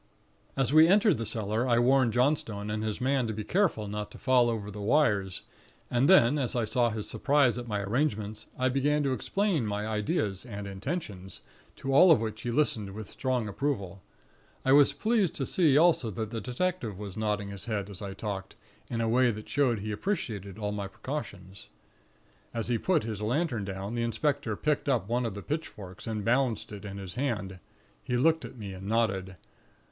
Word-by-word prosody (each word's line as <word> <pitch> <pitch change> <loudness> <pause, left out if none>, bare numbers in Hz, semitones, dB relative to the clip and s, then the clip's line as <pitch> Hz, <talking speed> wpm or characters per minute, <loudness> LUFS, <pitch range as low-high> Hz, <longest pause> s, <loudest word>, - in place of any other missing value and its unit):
"As 135 0 +1
we 155 +1 +8
entered 200 - +4
the 115 - -3
cellar, 110 +2 -1
I 120 -2 +3
warned 125 -1 +4
Johnstone 120 -6 0
and 105 0 -2
his 110 -1 -2
man 130 -1 +1
to 110 - -2
be 105 0 -4
careful 155 - +1
not 105 0 -4
to - - -12
fall 125 -2 +3
over 105 -3 -3
the 105 +1 -7
wires; 100 -6 +2 0.5
and 125 +4 +3
then, 150 -6 +6
as 125 -3 -1
I 120 -2 +1
saw 120 +2 +2
his 110 -2 -4
surprise 140 -4 +2
at 120 - -7
my 105 -2 -1
arrangements, 110 -2 -1
I 130 - +2
began 145 +3 +1
to 135 -2 +1
explain 195 - 0
my 105 0 -2
ideas 105 -2 -1
and 105 -4 -7
intentions, 95 - -5 0.3
to 135 - -3
all 180 +7 +8
of 160 - +7
which 110 -1 -4
he 120 - -3
listened 115 -7 0
with 110 -2 -8
strong 130 -4 -1
approval. 100 -4 -3 0.6
I 130 - +3
was 145 0 +7
pleased 215 -5 +1
to 135 - -1
see 155 -4 +3
also 160 -7 +4
that 110 +2 -4
the 115 -2 -3
detective 125 - -2
was 100 -2 -7
nodding 105 -2 -1
his 100 +1 -7
head, 105 -4 -2
as 100 -3 -9
I 100 -1 -5
talked, 95 -2 -5 0.3
in 115 -1 -2
a 115 - +1
way 125 +2 +4
that 110 -1 -5
showed 125 -7 +1
he 105 +1 -4
appreciated 105 - -3
all 105 -1 -2
my 100 -1 -3
precautions. 100 -6 -7 0.9
"As 115 0 -2
he 120 -2 +1
put 180 -5 +2
his 110 -2 -4
lantern 120 - 0
down, 95 +2 -5
the 120 - -1
inspector 115 0 0
picked 150 +4 0
up 120 -8 +1
one 120 +1 0
of 105 - -5
the 100 - -7
pitchforks, 105 - -6
and 105 -2 -3
balanced 125 -2 +1
it 105 -1 -8
in 100 -1 -6
his 95 -3 -7
hand; 105 -9 -2 0.4
he 125 - -1
looked 160 +5 +3
at - - -9
me, 100 -4 -6
and 95 +1 -8
nodded. 95 -4 0
115 Hz, 200 wpm, -29 LUFS, 105-135 Hz, 0.9 s, we